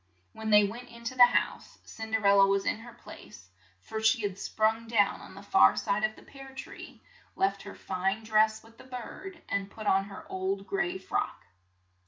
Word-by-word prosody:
When 220 0 -5
they 210 -1 +7
went 240 +5 -7
in 235 0 -13
to 235 +2 -4
the 245 -1 +9
house, 245 - -2
Cin 220 0 -8
der 220 -1 -1
el 200 0 +6
la 195 - +8
was 195 0 +1
in - - 0
her 235 +1 -12
place, 235 - -14 0.3
for 220 0 -5
she 220 +1 +3
had 200 -1 -3
sprung 220 +2 0
down 215 -3 +2
on - - -12
the 200 - -11
far 95 - +5
side 205 +2 0
of 215 0 0
the - - -16
pear 270 -1 -13
tree, 260 - -10 0.3
left 195 0 0
her 200 - -9
fine 195 +3 -2
dress 220 0 +2
with 225 +1 -20
the - - -12
bird, 260 +9 -9
and 200 0 -2
put 215 +1 -10
on 195 -1 +3
her 200 0 -10
old 190 +1 -3
gray 385 - -1
frock. 405 +2 -3
220 Hz, 210 wpm, -29 LUFS, 200-235 Hz, 0.3 s, the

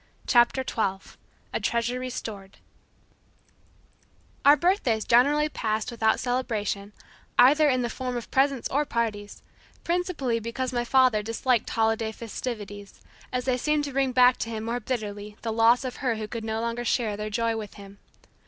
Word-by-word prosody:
CHAPTER 240 +1 +3
TWELVE 195 -6 -3 0.4
A - - 0
TREASURE 235 +2 -1
RESTORED 220 -6 -7 1.9
Our 290 +1 +7
birthdays 270 - +1
generally 285 +6 +4
passed 220 -4 -2
without 220 -2 +1
celebration, 220 -5 -2 0.5
either 295 +4 +6
in 255 -2 +1
the - - 0
form 250 0 -4
of 235 - -7
presents 270 -2 +2
or 290 +3 +1
parties, 220 -6 -3 0.4
principally 335 -9 -1
because 250 +3 -4
my 240 -1 0
father 255 -4 +4
disliked 230 +2 0
holiday 225 0 0
festivities, 210 -3 -7 0.3
as 250 -1 -2
they 255 -1 +1
seemed 300 +3 +1
to 285 -2 -5
bring 270 -1 +1
back 250 0 +5
to 225 - -4
him 220 -1 -4
more 235 +2 -2
bitterly 210 -3 -5
the 225 -1 -2
loss 230 +3 +4
of 255 -1 -5
her 250 -4 0
who 215 -1 -5
could 230 0 -6
no 220 0 -2
longer 235 +1 -2
share 230 -3 0
their 210 +1 -4
joy 230 +2 0
with 215 -2 -7
him. 200 -1 -13
235 Hz, 160 wpm, -26 LUFS, 220-255 Hz, 1.9 s, Our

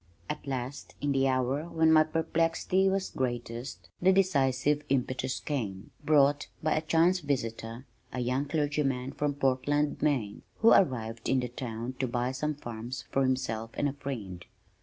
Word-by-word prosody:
At 150 -1 -5
last 130 0 -5
in 145 - 0
the 135 0 +3
hour 130 +5 0
when 160 -1 +3
my 155 -1 +7
perplexity 165 +4 +1
was 190 0 -1
greatest 120 -6 -4
the 185 +2 +6
decisive 145 -6 +2
impetus 130 -1 0
came, 105 -10 -4
brought 145 -1 +4 0.2
by 155 - +2
a 155 - +1
chance 165 +3 +3
visitor, 120 -4 -3 0.3
a 130 - -4
young 125 +3 0
clergyman 145 -3 0
from 145 -1 -1
Portland, 145 +2 +1
Maine, 130 -9 0 0.2
who 225 - +7
arrived 115 - +2
in 135 - +3
the 125 -1 -2
town 120 0 -5
to 130 - +1
buy 125 +1 -1
some 150 +3 -2
farms 120 -1 -6
for 135 - +2
himself 125 -4 0
and 145 - +1
a 140 - -2
friend. 115 -11 -6
135 Hz, 160 wpm, -29 LUFS, 125-150 Hz, 0.3 s, my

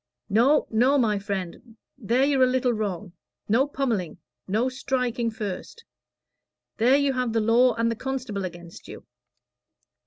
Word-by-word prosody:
"No, 255 +8 +4
no, 250 +6 +3
my 215 -6 +1
friend 200 +3 -6 0.2
there 250 +2 +1
you're 280 -2 +2
a 255 - +6
little 255 -1 +1
wrong. 205 -4 -4 0.3
No 245 +7 +2
pommelling 240 - -2 0.3
no 220 +6 +1
striking 250 -2 -2
first. 220 - -7 0.9
There 250 +5 +4
you 280 -1 +1
have 250 -3 -1
the 225 - +2
law 235 +3 +3
and 230 0 0
the - - -2
constable 250 -5 -4
against 175 -2 -9
you. - - -11
235 Hz, 145 wpm, -25 LUFS, 210-260 Hz, 0.9 s, a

